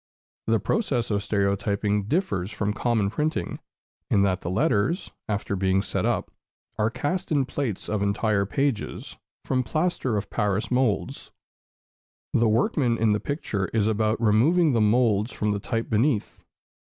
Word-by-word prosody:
The 115 0 +3
process 130 - 0
of 100 -1 +1
stereotyping 100 0 0
differs 150 - -1
from 105 -1 -2
common 110 -3 0
printing, 150 +6 -2 0.5
in 100 - +3
that 95 -1 +1
the 85 - -4
letters, 100 - +1 0.2
after 100 -1 -1
being 95 0 +1
set - - -1
up, - - -1 0.5
are 105 +1 +3
cast 145 +10 -3
in 140 -3 +2
plates 130 -6 -3
of 105 -2 -1
entire 100 0 +1
pages, 135 -2 -2 0.3
from 130 -1 +1
plaster 155 -5 -1
of 100 - -4
Paris 105 0 -1
moulds. 125 -4 0 1.0
The 115 -1 +3
workman 120 - +2
in 110 -1 +3
the 105 - 0
picture 105 - -2
is 110 -2 +2
about 110 0 +1
removing 140 +10 +4
the 115 -3 +2
moulds 110 0 +2
from 105 0 -1
the 100 - -1
type 115 +2 -2
beneath. 115 +1 0
110 Hz, 150 wpm, -25 LUFS, 100-130 Hz, 1.0 s, removing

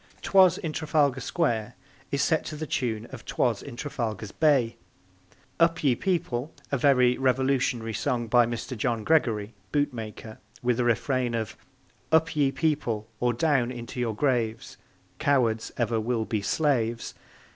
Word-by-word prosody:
'Twas 185 -2 +5
in 160 -2 -4
Trafalgar 150 -4 +1
Square 120 -8 -1 0.3
is 140 0 0
set 160 +2 +2
to 155 - -5
the 155 +1 -4
tune 115 -6 -2
of 130 -3 -9
'Twas 115 -5 0
in 140 - -9
Trafalgar's 115 -6 -4
Bay; 135 -7 +2 0.8
Up, 165 -1 +3
Ye 135 -4 +4
People! 155 -5 -1 0.2
a 140 - +2
very 125 -2 +4
revolutionary 130 -3 +1
song 120 +2 -1
by 120 +1 +4
Mr. 120 +2 -4
John 115 -1 -1
Gregory, 115 -9 +1 0.2
boot 145 -2 +1
maker, 110 -1 -8 0.2
with 125 0 +1
a - - +3
refrain 120 +1 +1
of 110 -3 -3 0.6
Up, 160 0 +3
ye 140 -3 +3
People! 130 -7 -1
or 120 0 +2
down 125 -1 +1
into 120 0 -7
your 115 -3 -1
graves! 115 -4 -1 0.4
Cowards 120 -6 +1
ever 115 -2 +1
will 115 0 -1
be 110 -2 -2
slaves! 120 -2 0
125 Hz, 150 wpm, -27 LUFS, 115-145 Hz, 0.8 s, Twas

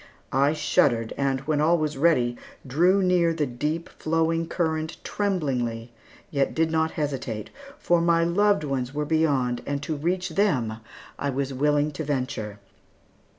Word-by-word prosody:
I 140 +3 +3
shuddered, 120 -6 +2
and 135 -1 0
when 150 +1 0
all 165 +3 +4
was 155 -2 -1
ready, 135 -5 +2 0.3
drew 175 +9 +3
near 175 -2 +3
the 155 -2 0
deep 150 +6 -3
flowing 165 +1 0
current 160 -2 -2
tremblingly, 125 - -2 0.4
yet 140 -2 0
did 160 0 +1
not 160 0 +2
hesitate; 135 -8 -3 0.3
for 175 -1 +2
my 170 0 +3
loved 200 +1 +2
ones 135 -2 -3
were 150 0 -1
beyond, 145 -6 +1
and 145 0 -2
to 155 - -2
reach 180 +5 -1
them 130 - +1 0.4
I 140 - -1
was 135 0 -2
willing 145 +2 +2
to 150 +2 -5
venture. 125 -7 -3
150 Hz, 150 wpm, -25 LUFS, 135-165 Hz, 0.4 s, all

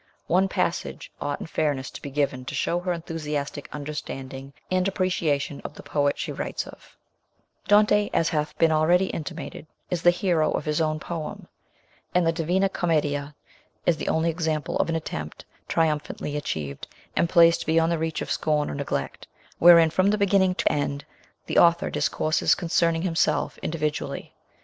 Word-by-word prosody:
One 185 +3 +3
passage - - -2
ought 145 0 -2
in - - -4
fairness 145 -5 -1
to - - -9
be 140 - -6
given 140 -2 -1
to - - -5
show 175 - 0
her 180 0 -2
enthusiastic 150 -4 -4
understanding 135 -2 -6 0.2
and 185 0 +2
appreciation 165 -7 -1
of - - -7
the - - -11
poet 145 -1 0
she - - -3
writes - - -4
of: - - -15 0.7
Dante, 210 0 +4
as 165 - +2
hath 150 -2 -2
been 165 -1 +4
already 175 +4 +3
intimated, 160 0 -6 0.2
is 175 -2 -1
the 175 - +6
hero 175 -3 +1
of - - -2
his 150 +1 0
own 155 -1 0
poem; 160 -1 -6 0.7
and 180 -1 +4
the 165 - +4
Divina 175 +4 +1
Commedia 150 -6 -1 0.5
is 170 - +3
the - - -5
only 165 +1 +2
example 160 -3 -2
of - - +1
an 165 - 0
attempt 75 - -5 0.2
triumphantly 150 -2 -1
achieved, 75 - -4 0.3
and 170 - +2
placed 170 -2 +5
beyond 165 +1 +3
the 170 - 0
reach 160 0 -2
of - - -6
scorn 150 -1 0
or - - -5
neglect, 140 -1 -4 0.3
wherein 170 -2 +8
from 185 +4 +3
beginning 200 -3 +3
to - - +1
end 145 -1 -2 0.4
the - - +2
author 170 0 +4
discourses 155 +1 +1
con 170 - -5
cerning 165 -1 +2
himself 170 -3 0
individually. 155 -2 -3
160 Hz, 165 wpm, -25 LUFS, 150-175 Hz, 0.7 s, wherein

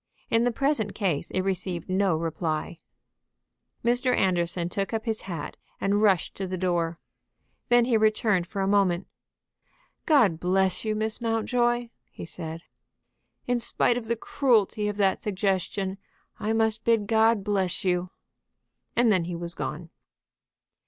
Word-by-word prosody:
In 230 +1 +3
the 245 - +2
present 240 -5 0
case 180 -9 -1
it 185 - -1
received 185 -2 -3
no 190 -2 +2
reply. 160 0 -3 1.1
Mr. 245 +1 +2
Anderson 175 -2 +1
took 195 +4 -3
up 220 - -3
his 220 -2 -2
hat 170 -6 -6 0.2
and 200 +1 +1
rushed 195 -6 +3
to 195 - -3
the 185 0 -3
door. 170 -2 0 0.7
Then 240 -1 +5
he 240 -2 +3
returned 215 -4 +2
for 195 +1 -4
a - - 0
moment. 195 -3 +2 1.0
"God 230 - +4
bless 185 +1 +1
you, 215 -1 -1
Miss 220 +2 -2
Mountjoy!" 240 +1 0 0.2
he - - -9
said. 165 -1 -7 0.8
"In 245 -1 +1
spite 235 +1 +1
of 235 -2 -4
the 235 - +1
cruelty 220 -4 +1
of 210 0 -3
that 195 -2 +2
suggestion, 195 -1 -1 0.4
I 215 - -1
must 220 0 +1
bid 230 -3 +2
God 220 -1 +3
bless 195 -1 -1
you." 180 0 +1 0.9
And 235 -2 +4
then 185 -4 +2
he 175 0 -4
was 170 0 -2
gone. 165 +1 -5
200 Hz, 145 wpm, -26 LUFS, 180-225 Hz, 1.1 s, Then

